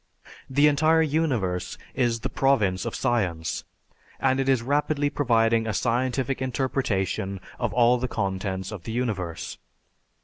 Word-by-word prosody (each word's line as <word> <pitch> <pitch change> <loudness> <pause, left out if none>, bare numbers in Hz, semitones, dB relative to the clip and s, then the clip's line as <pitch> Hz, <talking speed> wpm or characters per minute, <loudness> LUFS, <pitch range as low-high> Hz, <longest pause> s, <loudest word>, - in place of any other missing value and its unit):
The 145 +3 +4
entire 155 +2 +4
universe 130 - -1 0.2
is 120 -3 0
the - - -2
province 105 -10 +2
of - - -4
science 90 -9 -1 0.5
and 130 0 +2
it 135 0 +1
is 130 -3 +3
rapidly 145 +2 +1
providing 115 -5 +2
a 110 - -1
scientific 130 +3 0
interpretation 115 -7 -1 0.2
of 120 -3 -1
all 120 +1 +4
the 130 - -1
contents 95 -3 -3
of 105 -5 -6
the 115 - -4
universe. 100 -9 -3
120 Hz, 135 wpm, -25 LUFS, 100-135 Hz, 0.5 s, The